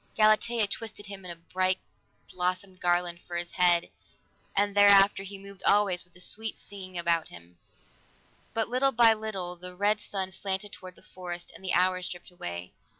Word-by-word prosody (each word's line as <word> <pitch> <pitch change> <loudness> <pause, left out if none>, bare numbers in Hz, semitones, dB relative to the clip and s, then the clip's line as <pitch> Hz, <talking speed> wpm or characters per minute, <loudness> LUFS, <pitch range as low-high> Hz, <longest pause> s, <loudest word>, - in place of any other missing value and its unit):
Galatea 215 +1 +4
twisted 205 0 -5
him 200 -1 -9
a 175 -1 -4
bright 185 +2 +1 0.5
blossomed 185 +1 -3
garland 175 -1 +1
for 175 - -6
his 175 0 -2
head, 175 -1 +3 0.6
and 205 0 +2
thereafter 200 -1 +7
he 195 0 -8
moved 200 0 -12
always 200 -3 +3
with 180 - -30
a - - -10
sweet 220 +4 -1
singing 185 -3 -8
about 170 -1 +1
him. 85 0 -15 1.0
But 225 -1 +1
little 255 +3 +2
by 230 -1 +6
little 200 -5 -3
the 180 +1 -10
red 205 +3 +2
sun 190 -2 -3
slanted 195 +2 -3
toward 185 -1 -10
the - - -19
forest, 175 -2 -7
and - - -14
the 185 - -1
hours 185 0 +2
dripped 175 +1 -9
away. 85 - -6
185 Hz, 170 wpm, -28 LUFS, 175-205 Hz, 1.0 s, thereafter